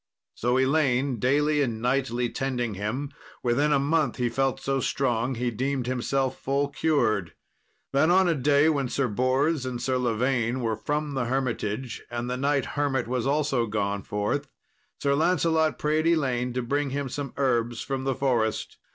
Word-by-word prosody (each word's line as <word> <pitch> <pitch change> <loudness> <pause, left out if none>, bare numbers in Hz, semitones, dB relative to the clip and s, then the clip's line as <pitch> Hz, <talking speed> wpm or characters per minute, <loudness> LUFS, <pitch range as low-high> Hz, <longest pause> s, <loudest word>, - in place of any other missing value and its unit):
So 125 +2 0
Elaine 130 -2 +2
daily 145 +5 +2
and 115 -5 -1
nightly 125 0 0
tending 125 -3 -2
him, 110 +9 -3 0.3
within 130 +5 +2
a 145 - +5
month 150 +2 +1
he 125 -2 0
felt 135 +1 0
so 135 0 -1
strong 125 -1 0
he 120 +1 -1
deemed 130 +2 -1
himself 130 +1 -1
full 140 +1 0
cured. 110 - 0 0.6
Then 140 +4 +3
on 185 +1 +5
a 170 - +3
day, 145 +1 +3
when 140 -5 +1
Sir 130 +2 0
Bors 130 +6 +1
and 125 -2 -4
Sir 130 0 0
Lavaine 120 +1 0
were 115 -2 0
from 145 +6 -2
the 130 -2 -1
hermitage, 125 -2 -2
and 120 0 -3
the 125 - -2
knight 140 +1 +1
hermit 135 -5 0
also 135 +3 0
was 115 - -2
gone 100 -1 -1
forth, 105 +10 -2 0.5
Sir 140 -1 +1
Lancelot 160 0 +2
prayed 155 +2 +1
Elaine 130 -7 +1
to 125 0 -2
bring 140 +3 0
him 140 +1 -2
some 140 +1 -5
herbs 120 -4 0
from 135 -1 -3
the 135 -1 0
forest. 120 -5 0
130 Hz, 170 wpm, -26 LUFS, 120-145 Hz, 0.6 s, a